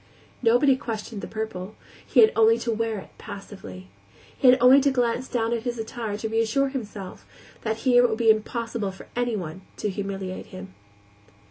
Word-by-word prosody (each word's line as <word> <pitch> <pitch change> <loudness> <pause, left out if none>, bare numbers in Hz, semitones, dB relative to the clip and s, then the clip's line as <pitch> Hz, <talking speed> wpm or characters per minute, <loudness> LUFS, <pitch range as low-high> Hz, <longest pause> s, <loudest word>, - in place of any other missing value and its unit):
Nobody 250 +3 +4
questioned 220 -4 -5
the - - -6
purple; 215 -2 -5 0.3
he - - +4
had 440 0 +7
only 225 +1 +5
to 235 0 -2
wear 225 0 -1
it 190 - -10
passively. 195 - -9 0.5
He 265 - +2
had 250 - +7
only 255 +3 +7
to 280 - +3
glance 250 -1 0
down 230 -2 -1
at 235 - -1
his 240 0 -3
attire 220 -1 -4
to 220 - -3
reassure 225 +5 +1
himself 210 -8 -7 0.4
that 220 -1 -2
here 245 -1 +6
it - - +3
would 220 - -1
be 225 -1 +5
impossible 220 -1 -2
for 190 - -13
anyone 200 -8 -2 0.2
to 210 - -2
humiliate 195 -1 -5
him. 95 0 -10
225 Hz, 175 wpm, -25 LUFS, 205-245 Hz, 0.5 s, had